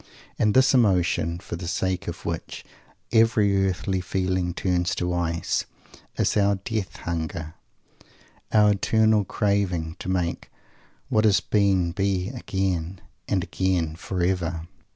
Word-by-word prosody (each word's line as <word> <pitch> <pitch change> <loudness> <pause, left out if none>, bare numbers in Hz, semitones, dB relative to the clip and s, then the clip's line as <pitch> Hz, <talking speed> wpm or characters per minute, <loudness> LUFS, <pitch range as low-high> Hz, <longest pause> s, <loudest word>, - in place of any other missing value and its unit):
And 105 -1 +2
this 130 +1 +5
emotion, 90 -7 +2
for 85 - -7
the 85 0 -6
sake 95 +2 -1
of 85 - -6
which 85 -1 -5 0.5
every 105 -4 +3
earthly 95 +1 -2
feeling 90 -1 -1
turns 90 0 0
to 90 0 -1
ice, 85 -1 -1 0.5
is - - +1
our 100 -1 +3
Death 100 0 -4
hunger, 80 -1 -4 1.0
our 105 -1 +5
eternal 110 +1 +3
craving 95 -5 -1
to - - -5
make 90 -2 -2 0.6
what 110 - +3
has 105 -3 +5
been 95 -4 +2
be 95 0 -1
again, 95 -7 -2 0.3
and 95 -3 0
again, 90 -5 -1
forever! 90 -2 -2
95 Hz, 125 wpm, -25 LUFS, 85-100 Hz, 1.0 s, this